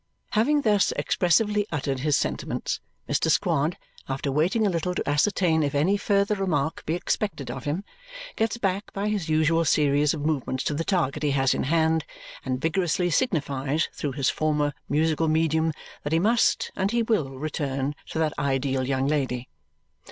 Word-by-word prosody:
Having 290 +7 +3
thus 205 -6 +3
expressively 205 +4 +2
uttered 140 -3 -2
his 145 +1 +2
sentiments, - - -2 0.3
Mr. - - +1
Squod, 150 +5 +1 0.3
after 135 +1 -2
waiting 175 +10 +2
a - - +3
little 180 +1 -1
to - - -3
ascertain 160 +2 +2
if 145 -1 -1
any 165 +8 +3
further 200 0 +1
remark 160 -7 -1
be 160 - +1
expected 175 - -2
of 130 +1 -7
him, 155 +7 -2 0.5
gets 225 +1 0
back 195 -2 -2
by 200 +1 -1
his 200 -7 -2
usual 160 +1 +3
series 145 -1 +3
of 145 -1 -5
movements 135 -4 -1
to - - -1
the 155 +3 -1
target 160 -6 0
he 150 - +1
has 135 -1 +2
in - - -1
hand 160 +1 +2 0.4
and 130 -1 -2
vigorously 175 +1 +1
signifies 150 - 0
through 145 -3 -3
his 140 0 0
former 150 -1 0 0.2
musical 160 +2 +1
medium 160 0 +2 0.3
that 145 - -2
he - - +4
must 220 +7 +2
and 190 +1 0
he 235 +1 +1
will 215 - +1
return 140 -1 -2 0.2
to - - -5
that 160 -2 +1
ideal 135 -1 0
young 135 0 0
lady. 130 -4 -1
155 Hz, 170 wpm, -25 LUFS, 140-185 Hz, 0.5 s, he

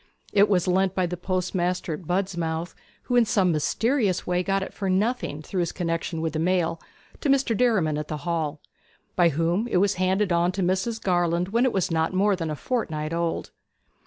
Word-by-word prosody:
It 205 0 +5
was 185 -3 +2
lent 190 +1 +2
by 185 - +2
the 175 +1 -3
postmaster 180 -1 -1
at 160 +1 -8
Budmouth 175 -3 -2 0.3
(who, 245 - -1
in 240 - +6
some 205 -5 +2
mysterious 200 - +1
way, 180 0 +1
got 195 +1 0
it - - -8
for 195 -2 -3
nothing 190 -5 0
through 185 - -3
his 170 -2 0
connexion 165 -1 -2
with 160 -2 -2
the 155 - -1
mail) 170 -1 0 0.4
to 295 - -1
Mr. 270 -4 +3
Derriman 195 -11 +2
at 150 - -5
the 150 -2 -6
Hall, 160 -3 -1 0.6
by 175 -2 +5
whom 165 +8 0
it 230 - +1
was 200 +2 +3
handed 190 +1 +1
on 170 +1 +2
to 190 0 -1
Mrs. 190 +6 0
Garland 175 -1 +1
when 235 +5 +2
it 255 - +2
was 190 -4 0
not 160 +2 0
more 200 +1 +3
than 165 -3 -3
a 155 - -2
fortnight 155 - -2
old. 170 0 -2
180 Hz, 200 wpm, -25 LUFS, 165-195 Hz, 0.6 s, in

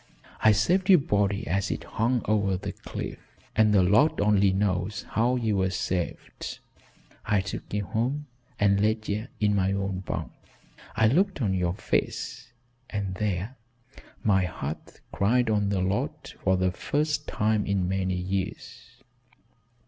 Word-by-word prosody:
I 110 - +6
saved 180 - +2
your 185 - +9
body 105 - 0
as 100 -1 0
it - - -3
hung 120 +1 0
over 100 -3 +1
the - - -5
cliff - - -7 0.4
and 110 0 +4
the 100 -3 +5
Lord 140 - +4
only 100 -1 +4
knows 100 +1 -1
how 120 +3 +2
ye 115 -4 0
were 95 -1 +2
saved. 90 -1 -3 0.7
I 105 - +2
took 95 - -5
ye 105 - 0
home 120 +8 -2 0.3
and 100 -1 +3
laid 110 +1 +1
ye 105 +3 -2
in 105 -1 +2
my 95 -1 +2
own 100 -1 -2
bunk, 95 - -4 0.6
and 110 +2 +4
looked 190 +2 +2
on 105 -7 +1
your 90 -1 0
face 115 - -2 0.4
and 100 -3 -3
there 100 +5 -2 0.7
my 95 -3 +3
heart 75 -3 -6
cried 115 +3 +2
on 105 -2 +1
the 100 -2 0
Lord 95 +2 -2
for 95 0 +3
the 90 0 +1
first 150 - -1
time 105 -1 +1
in 100 -2 +1
many 95 0 0
years. 95 +1 -5
100 Hz, 150 wpm, -27 LUFS, 95-110 Hz, 0.7 s, your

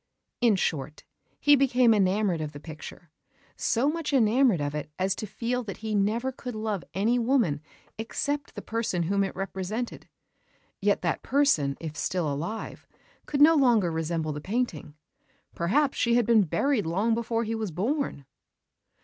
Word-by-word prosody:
In 235 -4 +5
short, 155 -4 -2 0.4
he 290 0 +6
became 255 -3 +4
enamoured 195 -3 +1
of 150 -1 -5
the 145 - -8
picture, 155 +1 -10 0.4
so 240 +4 +1
much 320 0 -1
enamoured 240 - +4
of 145 0 -2
it 150 0 -4
as 190 +1 +1
to 215 - -6
feel 245 +4 -2
that 200 - -6
he 215 - -2
never 215 +6 +1
could 250 -2 -7
love 215 -4 -2
any 225 +6 +2
woman 230 - +1 0.4
except 285 +5 -3
the - - -7
person 220 -6 -1
whom 200 +4 +1
it 195 - -4
represented. 195 +5 -4 0.7
Yet - - +1
that - - 0
person, 165 - +2
if 155 -2 -6
still 155 -1 -1
alive, 170 +10 -5 0.4
could 285 -1 -1
no 320 +2 +8
longer 240 - +3
resemble 160 -1 -2
the 150 - -6
painting: 185 -8 -3 0.6
perhaps 265 - +1
she 235 0 +3
had 240 -2 +3
been 220 -3 +4
buried 235 - 0
long 200 +7 +1
before 230 0 -1
he 225 0 -3
was 220 -2 -2
born! 205 - -2
215 Hz, 160 wpm, -27 LUFS, 170-245 Hz, 0.7 s, no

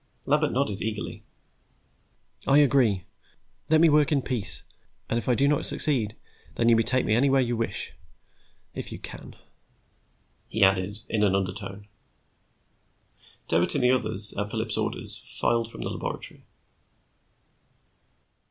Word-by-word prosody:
Lambert 150 +1 +2
nodded, 120 -7 -1
eagerly. 110 -1 -4 1.3
"I 140 - +5
agree. 125 -10 +3 0.7
Let 160 0 +4
me 170 - +7
work 150 -1 +3
in 140 -3 +1
peace, 120 -8 -4 0.4
and 115 - 0
if 115 - -5
I 125 - +3
do 140 +3 +2
not 145 0 +1
succeed 120 -9 0 0.4
then 115 - +2
you 115 - +6
may 115 - +3
take 130 +3 0
me - - +1
anywhere 135 +3 +3
you 120 -1 -1
wish. 115 0 -4 0.8
If - - -7
you - - -6
can," - - -10 1.1
he 110 0 0
added, 100 +3 +1
in 110 - -1
an 100 -2 +3
undertone. 100 +1 -4 1.6
Doherty 85 +2 +5
and - - 0
the 125 - +5
others, 110 -4 +4
at 105 0 -3
Phillips' - - -2
orders, - - -2 0.2
filed 115 -1 +1
from - - -9
the - - -4
laboratory. - - -5
115 Hz, 140 wpm, -26 LUFS, 105-135 Hz, 1.6 s, me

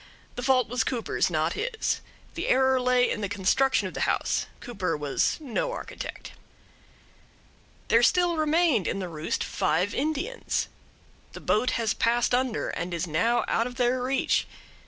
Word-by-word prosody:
The - - -5
fault 255 -1 +3
was 245 -1 0
Cooper's, 235 -2 -1
not - - 0
his. 480 -3 -2 0.3
The - - -4
error 260 0 +3
lay 250 0 +3
in 215 - -2
the 200 - -2
construction 205 +7 +2
of - - -8
the - - 0
house. - - 0
Cooper 190 -9 -3
was 145 -2 0
no 315 - -2
architect. - - -7 1.6
There 230 - +5
still 350 +6 +3
remained 310 - +2
in - - -1
the 190 -2 -3
roost 155 -1 -2
five 185 +5 0
Indians. 315 - -1 0.7
The - - -8
boat 235 +4 +2
has 230 -2 +1
passed 240 +1 +1
under 250 -2 0
and 170 +1 -3
is 170 +1 -2
now 205 +9 +1
out 230 - +1
of 250 - -8
their 250 0 +1
reach. 265 +2 +1
245 Hz, 155 wpm, -27 LUFS, 205-270 Hz, 1.6 s, There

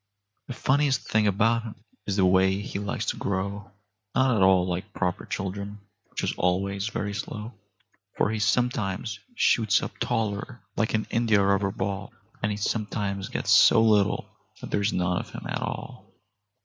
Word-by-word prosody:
The 130 - -6
funniest 135 0 +1
thing 110 -1 +2
about 110 +4 +2
him 115 -2 -8 0.3
is 100 - 0
the 95 -2 +4
way 95 +1 +4
he 100 -1 -4
likes 100 -1 -3
to - - -2
grow— 100 +1 -3 0.5
Not 130 -2 +3
at 105 - +1
all 95 -1 +5
like 95 +4 -4
proper 90 -2 -2
children, 100 +2 -4 0.3
which - - -5
is - - 0
always 100 +3 0
very 105 -3 -3
slow; 105 +2 -5 0.6
For 100 - +2
he 110 - -2
sometimes 110 -1 0 0.2
shoots 110 - +3
up - - -5
taller 110 +3 -2
like 110 0 +1
an 110 - 0
india 110 -4 +3
rubber 100 0 +2
ball, 95 0 -4 0.3
And 105 - +1
he 105 - -3
sometimes 100 -2 -2
gets - - -1
so - - +7
little 105 -3 +3 0.3
that - - -8
there's 100 +1 +1
none 90 0 0
of - - -7
him - - -8
at - - -3
all. - - -6
100 Hz, 170 wpm, -26 LUFS, 95-110 Hz, 0.6 s, so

